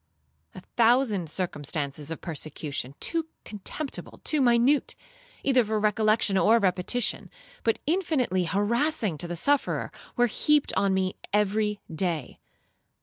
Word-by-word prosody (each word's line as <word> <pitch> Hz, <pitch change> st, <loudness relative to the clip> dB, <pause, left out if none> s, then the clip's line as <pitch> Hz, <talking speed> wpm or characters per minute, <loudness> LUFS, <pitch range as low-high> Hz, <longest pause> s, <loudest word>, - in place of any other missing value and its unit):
A -, -, -8 dB, 0.2 s
thousand 230 Hz, -, +3 dB
circumstances 150 Hz, -4 st, -3 dB
of 165 Hz, -, -5 dB
persecution, 145 Hz, -4 st, -5 dB
too 330 Hz, -1 st, 0 dB, 0.2 s
contemptible, 220 Hz, +8 st, -6 dB
too 305 Hz, -2 st, +2 dB
minute, 245 Hz, +3 st, +3 dB, 0.5 s
either 255 Hz, -3 st, +4 dB
for 215 Hz, 0 st, -1 dB
recollection 215 Hz, -1 st, +2 dB
or 225 Hz, +4 st, +5 dB
repetition, 195 Hz, +4 st, 0 dB, 0.3 s
but 225 Hz, -, +2 dB
infinitely 285 Hz, -, +1 dB
harassing 210 Hz, -, 0 dB
to 175 Hz, -, -4 dB
the 175 Hz, -, -4 dB
sufferer, 280 Hz, -, +1 dB, 0.2 s
were 245 Hz, -, +4 dB
heaped 295 Hz, +5 st, +2 dB
on 195 Hz, -1 st, +2 dB
me 190 Hz, -1 st, -1 dB, 0.2 s
every 210 Hz, 0 st, +1 dB
day. 160 Hz, -5 st, -2 dB
210 Hz, 120 wpm, -27 LUFS, 175-245 Hz, 0.5 s, or